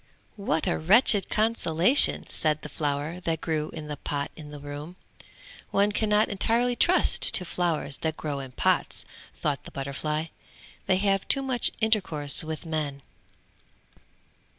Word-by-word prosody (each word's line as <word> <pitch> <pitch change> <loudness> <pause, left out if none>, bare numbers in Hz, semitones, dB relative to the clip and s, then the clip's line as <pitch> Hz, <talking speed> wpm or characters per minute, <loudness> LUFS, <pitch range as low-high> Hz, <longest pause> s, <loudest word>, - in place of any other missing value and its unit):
"What 180 -7 -1
a - - -1
wretched 200 +4 +4
consolation!" 215 - +3
said 155 -1 -2
the - - -7
flower, 150 +3 -3
that 165 -3 -3
grew 155 -2 -3
in 155 -2 -9
the 150 -1 -6
pot 140 -1 -4
in 150 -2 -11
the 150 - -9
room. 145 +4 -9 0.7
"One 200 +1 +1
can 215 +1 -1
not 210 +1 +3
entirely 235 +5 0
trust 350 +9 +3
to 180 - +3
flowers 165 -5 -2
that 160 -1 -3
grow 145 -2 -4
in 135 -2 -9
pots," - - 0 0.3
thought 145 -3 -3
the - - -9
butterfly, 150 +3 -4 0.6
"they 185 - +2
have 195 0 0
too 275 - +3
much 260 -2 0
intercourse 170 -11 +3
with 160 +1 -7
men." 150 -4 -4
160 Hz, 150 wpm, -26 LUFS, 150-205 Hz, 0.7 s, wretched